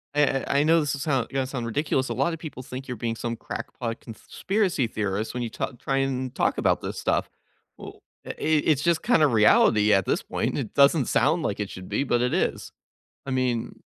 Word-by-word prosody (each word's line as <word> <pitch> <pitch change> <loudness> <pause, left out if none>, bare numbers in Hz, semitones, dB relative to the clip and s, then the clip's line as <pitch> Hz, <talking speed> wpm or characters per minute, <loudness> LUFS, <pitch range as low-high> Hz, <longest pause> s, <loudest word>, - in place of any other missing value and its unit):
a 150 - +4
a 135 -1 0
I 140 +1 +3
know 165 +2 +4
this'll 145 -2 -1
soun 135 -4 0
gonna 135 -1 -1
sound 125 -3 -4
ridiculous, 130 +1 -1
a - - -1
lotta 140 +7 0
people 150 -5 -8
think 130 +2 -8
you're 125 -3 -5
being 115 +1 -2
some 115 0 -3
crackpot 115 +1 -6
conspiracy 175 - -2
theorist 105 0 -3
when 125 - -3
you 115 - -3
tal 125 - -4
try 135 +3 -2
and 130 -2 -1
talk - - +1
about - - +1
this - - -5
stuff. - - 0 0.5
Well - - -11 0.2
eh - - -5
it 155 -1 +1
it's 145 - +1
just 170 -2 +1
kind 215 -10 +3
of 140 -6 +3
reality 105 0 +5
at 95 -1 +3
this - - 0
point. - - -2
It - - -4
doesn't 140 0 +4
sound 150 +8 +2
like 105 -7 -2
it 105 - -3
should 95 0 -9
be, - - 0
but 120 -3 +1
it 125 - 0
is. - - -1 0.5
I 135 - -4
mean, 125 -3 -1
130 Hz, 220 wpm, -25 LUFS, 115-145 Hz, 0.5 s, reality